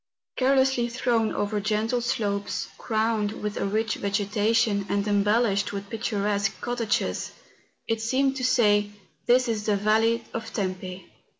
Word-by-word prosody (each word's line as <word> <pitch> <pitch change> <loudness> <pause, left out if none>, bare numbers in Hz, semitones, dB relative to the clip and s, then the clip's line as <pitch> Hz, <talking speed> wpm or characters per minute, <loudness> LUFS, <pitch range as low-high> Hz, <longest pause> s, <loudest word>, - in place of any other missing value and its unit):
Carelessly 265 -2 +2
thrown 235 -2 +1
over 205 +1 -1
gentle 215 +4 0
slopes, 205 -5 -2
crowned 220 -1 0
with 210 0 -2
a - - -1
rich 220 +2 0
vegetation, 205 +1 +1
and 200 +1 0
embellished 205 0 +2
with 200 0 -6
picturesque 205 -3 -1
cottages, 240 -3 -1 0.5
it 225 0 -1
seemed 265 +4 +1
to 260 - -4
say, 210 -5 +3
^ - - -24 0.3
This 250 +1 +4
is 220 -2 -2
the 210 - +3
Yale 220 +3 +2
of 225 0 -5
Tempo. 185 -2 -4
215 Hz, 135 wpm, -26 LUFS, 205-230 Hz, 0.5 s, This